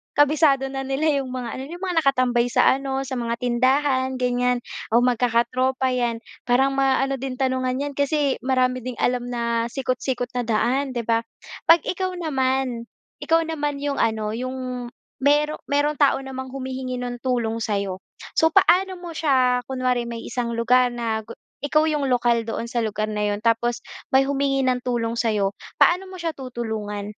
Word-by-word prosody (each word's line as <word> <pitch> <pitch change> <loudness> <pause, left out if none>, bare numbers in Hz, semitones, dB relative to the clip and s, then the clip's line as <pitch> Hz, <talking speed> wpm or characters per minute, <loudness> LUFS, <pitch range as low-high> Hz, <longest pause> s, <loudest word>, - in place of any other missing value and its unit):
kabisado 290 -2 +3
na 270 0 -4
nila 285 +2 +1
yung 270 - -4
mga 250 -1 -5
ano, - - -5
yung 350 +4 -9
mga 360 -3 +1
nakatambay 255 -4 +2
sa 245 - +4
ano, 270 0 -2
sa 260 -1 -4
mga 235 0 -1
tindahan, 260 +2 +1
ganyan, 250 -1 0 0.3
o 235 +2 +4
magkakatropa, 250 +2 +1
yan. 235 -2 -1 0.2
Parang 260 +3 +3
maano 270 0 +1
din 265 0 -4
tanungan 255 -1 0
yan 290 - -3
kasi 285 0 0
marami 255 -1 +1
ding 250 0 -6
alam 245 0 0
na 235 -1 -1
sikot-sikot 255 -1 -2
na 240 - -3
daan, 255 +4 0
di 235 - -1
ba? 230 0 +2 0.5
'Pag 330 -1 +7
ikaw 370 0 -2
naman, 265 -6 -1 0.3
ikaw 330 0 +2
naman 295 -3 -2
yung 285 -1 -1
ano, 215 -1 0
yung 255 0 -4 0.3
mayro 295 +2 +2
mayrong 290 +1 +1
tao 280 -2 +3
namang 260 -1 -6
humihingi 260 -1 -4
ng 245 0 -4
tulong 235 -3 0
sa'yo. 200 -4 -2 0.4
So, 320 0 +4
paano 370 0 +3
mo 335 -2 -7
siya 255 -5 +2
kunwari, 255 -2 -1
may 235 -1 -6
isang 235 -2 -3
lugar 245 +2 +3
na 225 -2 -2
gu 230 - -9 0.2
ikaw 305 +2 +2
yung 300 -2 0
lokal 240 -3 +2
doon 230 +1 -4
sa 235 -1 -1
lugar 215 0 -2
na 210 0 -1
'yon 205 0 -1
tapos 235 +1 +1 0.3
may 265 - +7
humingi 275 -1 +1
ng 255 -1 +2
tulong 235 -2 -1
sa'yo, 205 -4 0 0.2
paano 360 +2 +5
mo 375 -1 -9
siya 330 -1 -2
tutulungan? 220 -5 -4
255 Hz, 170 wpm, -23 LUFS, 235-275 Hz, 0.5 s, Pag